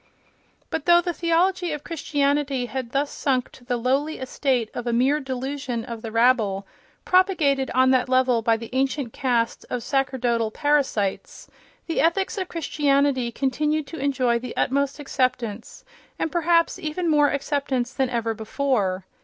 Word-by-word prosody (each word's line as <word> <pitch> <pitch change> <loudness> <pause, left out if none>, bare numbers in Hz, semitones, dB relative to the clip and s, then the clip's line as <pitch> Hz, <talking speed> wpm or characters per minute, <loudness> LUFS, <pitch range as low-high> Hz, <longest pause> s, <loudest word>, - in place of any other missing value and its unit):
But 320 -2 -3
though 345 0 +7
the 350 0 -2
theology 350 +1 +1
of 295 -1 -6
Christianity 285 -4 0
had 255 -1 -5
thus 280 +2 0
sunk 255 -3 -1
to 260 - -16
the 245 0 -1
lowly 270 +6 0
estate 260 -3 -1
of 245 0 -5
a 235 - 0
mere 265 +5 +3
delusion 265 -2 -4
of 230 -2 -7
the 225 - -6
rabble, 225 -4 +2 0.4
propagated 335 -8 +3
on 260 0 +5
that 255 -1 +2
level 255 -2 +3
by 225 0 +2
the 230 0 -9
ancient 265 -2 -1
caste 240 -3 0
of 245 -2 -3
sacerdotal 250 -4 0
parasites, 265 -7 -1 0.4
the 330 - 0
ethics 380 +5 +1
of 370 - -4
Christianity 280 -5 +1
continued 300 +4 0
to 325 +3 -8
enjoy 260 -4 +1
the 245 0 -8
utmost 280 +1 0
acceptance, 250 -6 -2 0.3
and 320 - -2
perhaps 335 0 +2
even 320 +3 -3
more 295 -2 +4
acceptance 275 -3 -1
than 265 -1 0
ever 230 -2 -1
before. 215 -5 -1
265 Hz, 155 wpm, -24 LUFS, 245-295 Hz, 0.4 s, though